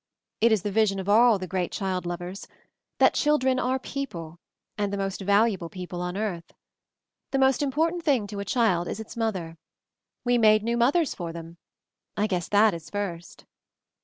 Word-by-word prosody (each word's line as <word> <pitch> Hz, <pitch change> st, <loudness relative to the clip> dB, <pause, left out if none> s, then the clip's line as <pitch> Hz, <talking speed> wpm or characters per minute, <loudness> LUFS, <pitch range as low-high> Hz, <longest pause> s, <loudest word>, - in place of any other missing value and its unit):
It 230 Hz, +1 st, +4 dB
is 215 Hz, -4 st, +2 dB
the 205 Hz, -, -2 dB
vision 205 Hz, -2 st, +2 dB
of 190 Hz, -, -5 dB
aU 225 Hz, +2 st, +5 dB
the 185 Hz, -, -5 dB
great 185 Hz, -1 st, -2 dB
childi 185 Hz, -3 st, -2 dB
lovers; 175 Hz, +2 st, -6 dB, 0.5 s
that -, -, +5 dB
children 265 Hz, -4 st, +2 dB
are 260 Hz, +1 st, 0 dB
people, 175 Hz, -, -6 dB, 0.4 s
and 205 Hz, -1 st, -1 dB
the 200 Hz, -, -2 dB
most 195 Hz, 0 st, -3 dB
valuable 200 Hz, -3 st, +2 dB
people 180 Hz, -1 st, -6 dB
on 180 Hz, +1 st, -3 dB
earth. 185 Hz, -6 st, -4 dB, 0.7 s
The 270 Hz, -, -1 dB
most 265 Hz, 0 st, +3 dB
important 320 Hz, +5 st, 0 dB
thing 270 Hz, -9 st, +2 dB
to 205 Hz, 0 st, -7 dB
a 200 Hz, -, -4 dB
child 200 Hz, -6 st, +1 dB
is 200 Hz, -, -4 dB
its 220 Hz, -, -8 dB
mother. 185 Hz, -8 st, -3 dB, 0.7 s
We 245 Hz, 0 st, +3 dB
made 215 Hz, -1 st, +5 dB
new 235 Hz, +1 st, 0 dB
mothers 275 Hz, +7 st, +2 dB
for 170 Hz, -2 st, -5 dB
them 165 Hz, 0 st, -9 dB, 0.3 s
— -, -, -56 dB
I 210 Hz, -, +2 dB
guess 180 Hz, -5 st, -2 dB
that 210 Hz, +1 st, +4 dB
is 165 Hz, -2 st, -8 dB
'first.' 180 Hz, -5 st, -5 dB
205 Hz, 185 wpm, -26 LUFS, 180-235 Hz, 0.7 s, aU